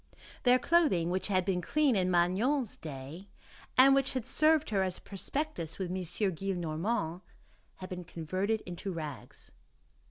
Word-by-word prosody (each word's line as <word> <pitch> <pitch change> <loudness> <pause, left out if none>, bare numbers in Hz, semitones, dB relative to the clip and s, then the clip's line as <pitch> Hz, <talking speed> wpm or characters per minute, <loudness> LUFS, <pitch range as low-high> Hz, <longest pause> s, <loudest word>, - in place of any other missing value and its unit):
Their 250 0 +5
clothing, 255 - +2
which 185 +1 -1
had 185 -3 +1
been 185 -2 0
clean 290 - +2
in 185 -2 +1
Magnon's 200 +9 +1
day, 155 +6 -9 0.5
and 270 +1 +8
which 270 -1 +2
had 255 -4 -3
served 310 -4 +3
her 195 -2 +2
as 185 -1 0
a - - -16
prospectus 200 - -3
with 185 -2 -3
M. 185 - -2
Gillenormand, 180 0 -2 0.5
had 185 0 -9
been 180 -1 -6
converted 185 +7 -2
into 180 +2 -5
rags. 155 -6 -7
190 Hz, 150 wpm, -31 LUFS, 175-245 Hz, 0.5 s, and